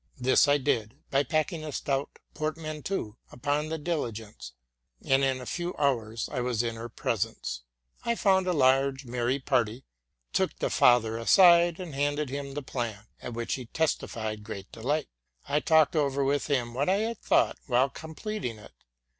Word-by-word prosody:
This 130 +2 +4
I 145 0 +5
did 130 -5 -1 0.2
by 135 - +4
packing 155 +2 -1
a 155 - -5
stout 140 0 -2 0.2
portmanteau 155 - -4
upon 145 +4 -1
the 160 - -2
diligence, 115 - -4 0.5
and 135 0 +3
in 135 -1 +1
a 125 - -8
few 175 +5 -3
hours 115 -6 0
I 125 - -3
was 120 -2 0
in 115 -1 -2
her 115 +1 -7
presence. 110 - -2 0.4
I 235 - +1
found 190 -3 +3
a - - +3
large, 135 -2 +3
merry 120 +2 0
party, 125 -3 0 0.5
took - - 0
the - - -1
father 115 -2 +4
aside, 170 +6 +6
and 175 -5 -6
handed 145 0 -1
him 140 0 -5
the 145 - -4
plan, 120 -6 -4 0.2
at 125 - -6
which 115 0 -2
he 130 - -4
testified 110 -7 -2
great 100 -3 -8
delight. 145 +6 -1 0.4
I 145 +2 +2
talked 160 0 +4
over 140 -2 +1
with 140 +1 0
him 125 -5 0
what 140 +7 0
I 190 - +4
had 230 0 -2
thought - - +2
while 130 +1 +3
completing 160 - -5
it. 105 - -14
135 Hz, 170 wpm, -28 LUFS, 120-155 Hz, 0.5 s, aside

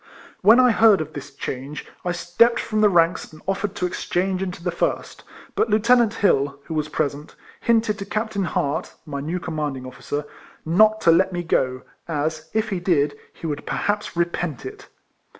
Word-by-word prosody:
When 220 +5 +7
I 250 -1 +6
heard 220 -2 +5
of 155 0 -5
this 145 0 -7
change, 135 +1 -6 0.2
I 180 - -1
stepped 175 +8 +2
from 215 -1 -1
the 210 - +6
ranks 170 -1 +2
and 155 - -14
offered 195 +1 -1
to 180 - -1
exchange 185 +1 -1
into 180 -3 -4
the 175 - 0
first, 170 - -2 0.3
but - - +1
Lieu 210 - +4
tenant 235 0 +4
Hill, 140 -7 +2
who 165 - -7
was 155 -1 -1
present, 145 0 -3 0.2
hinted 225 -2 +1
to 195 - -4
Cap 220 +2 -2
tain 200 -3 -1
Hart 145 -4 -2
(my 140 -2 -5
new 165 +5 -3
commanding 150 -6 -4
officer) 145 +3 -5 0.4
not 215 +6 +4
to 165 - +5
let 185 +3 +4
me 175 -1 -3
go, 130 -5 0 0.2
as, 155 0 -2
if 220 0 0
he 195 -3 -2
did, 150 -5 +1 0.2
he - - -11
would 145 -2 -4
perhaps 205 -3 -2
repent 170 -5 -2
it. - - -9
175 Hz, 185 wpm, -23 LUFS, 150-205 Hz, 0.4 s, When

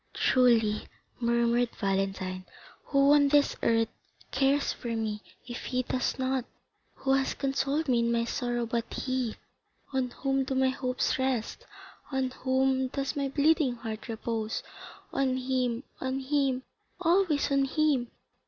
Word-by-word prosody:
"Truly," 230 -4 +3 0.3
murmured 235 0 +2
Valentine, 195 -2 -1 0.4
"who 275 0 +4
on 290 -1 +5
this 290 0 +3
earth 225 0 +2 0.4
cares 275 +2 +2
for 235 -1 -4
me, 215 -2 -2 0.3
if 240 -1 -6
he 255 0 0
does 255 +1 -1
not? 260 -1 0 0.5
Who 270 0 0
has 270 0 +1
consoled 275 +3 0
me 245 -3 +3
in 235 0 +1
my 230 0 +1
sorrow 240 0 -1
but 230 0 -2
he? 255 -4 -2 0.6
On 260 -1 0
whom 270 +2 0
do 265 0 -3
my 260 0 +3
hopes 255 0 -1
rest? 260 -4 -1 0.4
On 265 -1 0
whom 260 0 +1
does 275 +3 -3
my 280 -1 -1
bleeding 290 -2 +3
heart 225 -1 -6
repose? 225 -1 -3 0.5
On 265 -1 +1
him, 255 -1 -1 0.2
on 260 0 -2
him, 270 -1 0 0.4
always 335 -5 +2
on 275 0 +3
him! 280 -3 +1
260 Hz, 140 wpm, -29 LUFS, 235-275 Hz, 0.6 s, on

